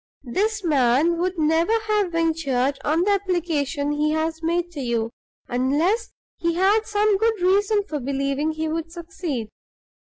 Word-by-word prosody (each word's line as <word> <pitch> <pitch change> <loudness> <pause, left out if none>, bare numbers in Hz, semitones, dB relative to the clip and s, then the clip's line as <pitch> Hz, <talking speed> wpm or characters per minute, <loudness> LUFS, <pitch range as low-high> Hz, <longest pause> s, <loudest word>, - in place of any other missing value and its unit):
"This 420 +1 0
man 295 +2 +3
would 365 +1 -1
never 325 +7 +2
have 415 -4 +1
ventured 285 -5 0
on 320 +4 +2
the 410 - +2
application 330 -7 0
he 300 +1 +1
has 320 +1 -1
made 340 +1 -1
to 315 - -8
you, 230 -2 -1 0.4
unless 300 - 0 0.3
he 335 0 -1
had 405 +5 +3
some 420 -1 +2
good 445 0 +1
reason 405 +3 +2
for 310 -7 -4
believing 275 +3 -1
he 315 0 -3
would 330 +1 -3
succeed. 330 - -5
330 Hz, 150 wpm, -23 LUFS, 290-385 Hz, 0.4 s, man